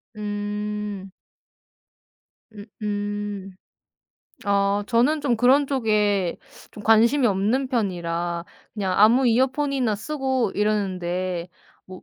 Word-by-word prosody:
음. 210 -1 -4 1.4
음 205 -1 -10 0.2
음. 205 -1 -4 0.9
아, 200 0 +1
저는 250 +7 +2
좀 250 -5 +1
그런 265 +5 +4
쪽에 210 -8 +1 0.3
좀 210 - -11
관심이 230 +5 +4
없는 220 +6 +1
편이라 175 -7 -2 0.3
그냥 195 -3 -1
아무 240 +5 +5
이어폰이나 260 0 +1
쓰고 260 0 -1
이러는데 185 -4 -1 0.4
뭐 185 -1 -11
210 Hz, 180 characters per minute, -23 LUFS, 195-245 Hz, 1.4 s, 아무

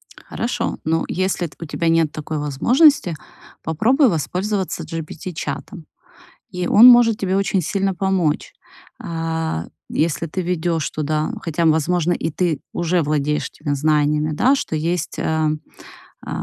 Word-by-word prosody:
Хорошо, 235 - -3
но 160 +1 0
если 185 -1 -1
т - - -18
у 170 - -6
тебя 165 +2 -1
нет 165 -2 +2
такой 155 0 -5
возможности, 180 - +3 0.5
попробуй 245 - +3
воспользоваться 190 +4 -2
GPT-чатом, 165 +1 -6 0.7
и 180 0 -3
он 225 +7 +7
может 240 -3 +6
тебе 190 0 0
очень 195 -2 +1
сильно 195 +3 -1
помочь. 185 - 0 0.5
А, 165 - -3 0.2
если 165 +1 -1
ты 170 +4 -4
введёшь 170 -2 -1
туда 155 0 -1
хотя, 165 0 -1
возможно, 165 +2 +2
и 165 - -2
ты 165 -2 0
уже 175 0 0
владеешь 150 0 -1
теми 145 -1 -3
знаниями, 150 +1 +1
да, 255 - +3
что 160 - -4
есть 165 +2 -2
э, - - -1 1.0
э, - - -8
165 Hz, 135 wpm, -20 LUFS, 155-190 Hz, 1.0 s, он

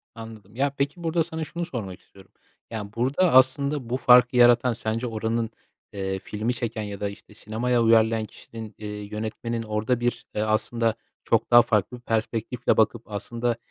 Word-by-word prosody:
Anladım. 110 -2 -11
Ya, 140 +3 +1
peki, 145 +5 -2
burada 165 0 +1
sana 160 -1 -5
şunu 170 +2 -4
sormak 105 - -6
istiyorum. 95 -1 -19 0.4
Yani, 105 -2 -6
burada, 140 +9 +2
aslında, 130 0 +3
bu 125 - 0
farkı 125 -1 +6
yaratan 120 0 +5
sence 115 +2 -3
oranın, 115 0 -2 0.4
eee, 95 -1 -3
filmi 110 +5 -3
çeken 115 -2 -4
ya 100 -1 -6
da, 100 - -1
işte, 100 +1 -13
sinemaya 115 +3 0
uyarlayan 115 -1 +4
kişinin, 110 0 -11
eee, 105 - -7
yönetmenin 110 +3 -4
orada 110 +3 -1
bir, 120 0 -2
eee, 105 - 0
aslında, 110 +1 0 0.3
çok - - +1
daha 120 0 +9
farklı 110 +1 0
bir - - -17
perspektifle 115 +1 -1
bakıp, 110 +1 +2
aslında, 120 +3 -2
115 Hz, 165 wpm, -25 LUFS, 110-125 Hz, 0.4 s, daha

